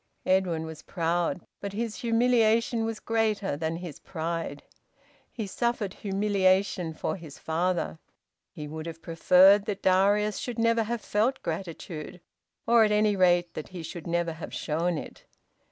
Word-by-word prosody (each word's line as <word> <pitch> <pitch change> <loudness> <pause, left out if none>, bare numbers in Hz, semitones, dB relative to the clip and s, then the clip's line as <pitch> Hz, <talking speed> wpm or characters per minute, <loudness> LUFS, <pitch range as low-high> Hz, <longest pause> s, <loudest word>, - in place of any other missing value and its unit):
Edwin 180 -4 +1
was 160 -1 -8
proud, 170 0 -1
but 200 -1 -5
his 220 +1 -3
humiliation 230 -1 +2
was 225 -1 -3
greater 215 -7 0
than 160 +2 -2
his 170 -4 -7
pride. 165 -3 -4 0.7
He 220 - -4
suffered 215 -1 -1
humiliation 195 -4 +1
for - - -2
his 160 -5 -11
father. 165 - -1 0.5
He 150 - -7
would 155 +2 -6
have 165 -1 -8
preferred 185 +4 +5
that 205 -3 -4
Darius 200 +3 +3
should 245 -2 -5
never 230 0 +3
have 235 +1 -3
felt 220 +7 0
gratitude, 165 -1 -5 0.5
or, 230 0 +6
at 210 - +2
any 210 0 +3
rate, 175 -2 +3
that 155 - -6
he 180 -3 -8
should 165 +1 -7
never 170 -1 0
have 160 - -8
shown 165 +2 -1
it. - - -9
185 Hz, 150 wpm, -27 LUFS, 165-215 Hz, 0.7 s, or